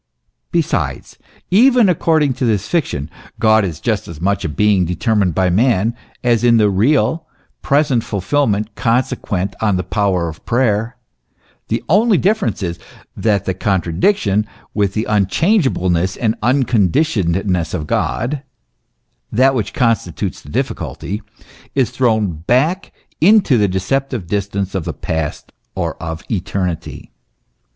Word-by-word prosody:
Besides, 170 -3 -2 0.3
even 240 +3 +5
according 160 -5 +2
to 125 - -2
this 110 -3 0
fiction, 120 - -1 0.3
God 110 -1 +4
is 85 -5 -4
just 110 -2 -1
as 85 -3 -9
much 100 +4 0
a - - -2
being 100 +3 +2
determined 90 0 0
by 95 -1 +2
man, 115 +2 +2 0.3
as 120 -2 +2
in 120 -1 +5
the 105 -2 +3
real, 130 - +1 0.3
present 140 -5 +2
fulfilment 105 0 -1
consequent 105 -6 -1
on 105 -3 +2
the 90 - -2
power 95 -5 0
of 80 -1 -9
prayer; 115 -1 0 0.7
the - - -2
only 210 +3 +4
difference 200 - 0
is, 85 -1 -3 0.4
that 105 -4 0
the 95 - 0
contradiction 100 - +1 0.3
with 100 -2 0
the 110 - 0
unchange 130 - +2
ableness 90 -1 -1
and 110 -2 +1
unconditionedness 100 - +1
of 80 -4 -3
God 130 - -1 0.9
that 130 +4 +4
which 110 -7 -2
con 115 -3 +3
stitutes 85 -7 -6
the - - -14
difficulty 105 +4 -3 0.5
is 135 -4 +1
thrown 110 -6 +1
back 135 - 0 0.3
into 195 - +5
the 105 -3 +3
deceptive 120 +4 -2
distance 100 0 -2
of 95 -4 -2
the 85 - -3
past 80 +1 -4 0.2
or - - -2
of 80 0 -5
eternity. 90 -4 -3
105 Hz, 135 wpm, -17 LUFS, 95-130 Hz, 0.9 s, even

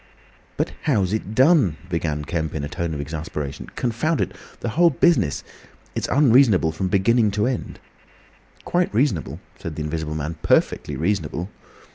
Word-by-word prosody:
"But - - 0
how's 105 - +2
it 110 -1 -3
done?" 130 - +4
began 80 -4 -2
Kemp, 80 -2 -2
in 75 - -3
a - - -2
tone 85 +1 -3
of - - -5
exasperation. 75 -1 -5
"Confound 125 +7 0
it! - - 0 0.3
The 120 - -2
whole 170 +9 +4
business—it's 160 - -1
unreasonable 125 - +4
from 85 +4 -2
beginning 105 +4 +3
to 105 - +2
end." 125 -2 -3 0.9
"Quite 175 0 +1
reasonable," 110 - 0 0.2
said 80 - -6
the 75 - -3
Invisible 75 0 -3
Man. 80 +1 -4
"Perfectly - - +1
reasonable." 85 0 -2
95 Hz, 145 wpm, -22 LUFS, 80-125 Hz, 0.9 s, done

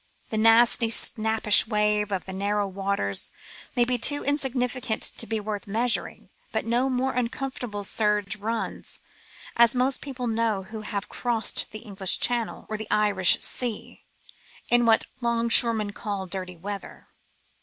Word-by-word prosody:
The 220 - -1
nasty 225 +1 +5
snappish 220 -1 +4
wave 210 -1 +1
of 190 -2 -3
the 190 - -7
narrow 200 +1 -1
waters 195 - -1 0.4
may 240 -1 +3
be 245 0 -1
too 290 +5 +3
insignificant 255 -5 -1
to 230 - +1
be 225 -1 -2
worth 210 -1 -5
measuring, 230 +4 -1 0.2
but - - -2
no 240 +3 +1
more 260 +1 -1
uncomfortable 245 -3 -4
surge 210 0 +1
runs, 225 +2 -3 0.6
as 235 +1 +5
most 255 +2 0
people 265 -3 -6
know 225 -3 0
who 215 +3 -8
have 205 -1 -5
crossed 235 -3 -1
the 215 +2 -10
English 195 -3 0
Channel 240 -2 0
or 215 - -4
the 220 0 -6
Irish 205 -3 +3
Sea, 240 -4 -3 0.7
in 240 -1 +3
what 225 -1 +4
'longshoremen 230 -2 +3
call 200 -2 -5
dirty 185 -1 -6
weather. 200 +3 -8
220 Hz, 145 wpm, -25 LUFS, 205-240 Hz, 0.7 s, nasty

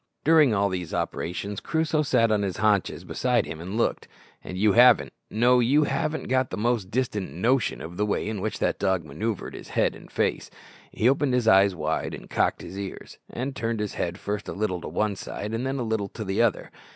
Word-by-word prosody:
During 155 -4 +5
all 100 -1 +2
these 90 -3 -4
operations 100 +4 -3
Crusoe 160 -1 0
sat 115 -6 +2
on 105 -1 +2
his 95 -3 -2
haunches 105 -3 +1
beside 125 -2 0
him 80 0 -7
and 95 +5 -5
looked. 115 - 0 0.4
And 90 - -6
you 105 +2 +4
haven't, 125 +1 +6 0.2
no, 120 +3 +4
you 135 +6 +4
haven't 155 +1 -1
got 130 -1 +1
the - - -5
most 110 -3 0
distant 105 - -2
notion 115 - +1
of 85 +2 -8
the 105 - +1
way 105 - -1
in 110 -3 -3
which - - -2
that - - 0
dog 95 -4 0
manoeuvred 105 +8 -4
with - - -7
his - - -12
head - - +2
and - - -14
face. - - -1 0.4
He 115 - +1
opened 135 0 +2
his 120 -3 0
eyes 95 -2 +5
wide, - - -2
and - - -13
cocked - - +1
his 95 - -7
ears, 100 -1 -8
and 130 +2 -4
turned 115 -1 -2
his 105 -1 -3
head 85 0 -3
first 105 0 -4
a - - -4
little 95 -4 -2
to - - -6
one 105 -1 -1
side, 105 +2 -6
then 115 +3 -2
a 125 - -2
little 110 -3 -1
to 110 - -7
the 95 +3 0
other. 115 -4 0
110 Hz, 220 wpm, -26 LUFS, 95-125 Hz, 0.4 s, haven't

